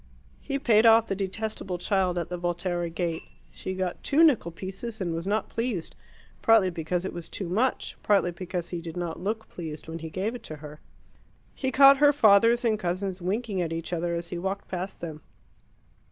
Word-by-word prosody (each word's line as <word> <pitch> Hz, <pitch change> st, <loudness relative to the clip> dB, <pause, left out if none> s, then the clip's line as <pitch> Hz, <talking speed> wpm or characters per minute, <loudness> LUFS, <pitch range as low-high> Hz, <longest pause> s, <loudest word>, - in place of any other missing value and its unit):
He 275 Hz, -, -3 dB
paid 230 Hz, -4 st, +4 dB
off 225 Hz, 0 st, +7 dB
the 195 Hz, -, -2 dB
detestable 195 Hz, -1 st, -3 dB
child 185 Hz, -1 st, +1 dB
at 170 Hz, -, -2 dB
the 180 Hz, -, -3 dB
Volterra 175 Hz, 0 st, -1 dB
gate. 165 Hz, 0 st, -2 dB, 0.3 s
She 185 Hz, -, -5 dB
got 185 Hz, -1 st, -3 dB
two 305 Hz, +4 st, +4 dB
nickel 275 Hz, -, +4 dB
pieces 195 Hz, +6 st, -7 dB
and 175 Hz, -4 st, -2 dB
was 165 Hz, +3 st, -4 dB
not 210 Hz, +2 st, 0 dB
pleased, 230 Hz, -8 st, -3 dB, 0.5 s
partly 220 Hz, -5 st, +5 dB
because 170 Hz, +2 st, -2 dB
it -, -, -4 dB
was 175 Hz, -1 st, -7 dB
too 190 Hz, -, -4 dB
much, 225 Hz, +9 st, 0 dB
partly 195 Hz, -4 st, +3 dB
because 175 Hz, 0 st, -5 dB
he 175 Hz, -2 st, -4 dB
did 165 Hz, 0 st, -7 dB
not 175 Hz, -2 st, -3 dB
look 220 Hz, +4 st, -3 dB
pleased 160 Hz, -3 st, -7 dB
when 165 Hz, +1 st, -5 dB
he 160 Hz, 0 st, -6 dB
gave 195 Hz, +7 st, -2 dB
it 245 Hz, -, -7 dB
to 155 Hz, -, -8 dB
her. 150 Hz, 0 st, -10 dB, 0.7 s
He 265 Hz, -, -2 dB
caught 275 Hz, 0 st, +8 dB
her 290 Hz, +1 st, +6 dB
fathers 230 Hz, -1 st, +5 dB
and 215 Hz, -2 st, +2 dB
cousins 185 Hz, 0 st, -2 dB
winking 200 Hz, +1 st, -1 dB
at 165 Hz, -2 st, -2 dB
each 165 Hz, +1 st, -4 dB
other 170 Hz, 0 st, -1 dB
as 170 Hz, 0 st, -4 dB
he 175 Hz, -, -4 dB
walked 195 Hz, +2 st, -3 dB
past 185 Hz, +1 st, -5 dB
them. 155 Hz, -3 st, -6 dB
185 Hz, 195 wpm, -27 LUFS, 170-220 Hz, 0.7 s, caught